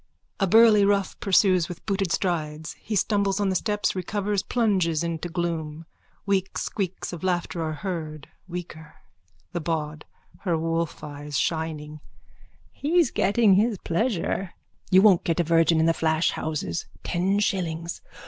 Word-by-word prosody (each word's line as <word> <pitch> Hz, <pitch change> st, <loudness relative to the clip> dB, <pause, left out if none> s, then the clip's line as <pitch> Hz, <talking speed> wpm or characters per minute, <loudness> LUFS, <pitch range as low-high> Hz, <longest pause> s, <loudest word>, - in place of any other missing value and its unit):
A 195 Hz, -, +2 dB
burly 220 Hz, +1 st, +6 dB
rough 200 Hz, -1 st, +1 dB
pursues 185 Hz, -3 st, +3 dB
with 175 Hz, -, -9 dB
booted 195 Hz, -3 st, -1 dB
strides. 160 Hz, -5 st, -2 dB
He 215 Hz, -, -4 dB
stumbles 200 Hz, -1 st, +1 dB
on 200 Hz, -1 st, +1 dB
the 190 Hz, -, 0 dB
steps, 210 Hz, +2 st, 0 dB
recovers, 200 Hz, +2 st, -1 dB
plunges 185 Hz, -10 st, +1 dB
into 170 Hz, +1 st, -3 dB
gloom. 165 Hz, -2 st, -3 dB, 0.4 s
Weak 195 Hz, -1 st, 0 dB
squeaks 190 Hz, -2 st, -3 dB
of 175 Hz, -, -7 dB
laughter 175 Hz, -2 st, -1 dB
are 160 Hz, -1 st, -2 dB
heard, 155 Hz, -5 st, -4 dB, 0.2 s
weaker.)_ 165 Hz, -3 st, -8 dB, 0.6 s
THE 175 Hz, -, -3 dB
BAWD: 155 Hz, -2 st, -3 dB, 0.4 s
(Her 175 Hz, -5 st, 0 dB
wolfeyes 150 Hz, -3 st, -3 dB
shining.) 155 Hz, -2 st, -2 dB, 0.7 s
He's 320 Hz, -1 st, +1 dB
getting 205 Hz, +1 st, +3 dB
his 210 Hz, +2 st, +2 dB
pleasure. 190 Hz, -1 st, -1 dB, 0.3 s
You 190 Hz, +1 st, +6 dB
won't 195 Hz, -5 st, +6 dB
get 165 Hz, 0 st, 0 dB
a -, -, +4 dB
virgin 165 Hz, 0 st, +3 dB
in 160 Hz, -, +3 dB
the 165 Hz, -, +4 dB
flash 160 Hz, +1 st, +1 dB
houses. 150 Hz, -, -3 dB, 0.2 s
Ten 185 Hz, +3 st, 0 dB
shillings. 170 Hz, -5 st, -2 dB
175 Hz, 140 wpm, -25 LUFS, 160-200 Hz, 0.7 s, burly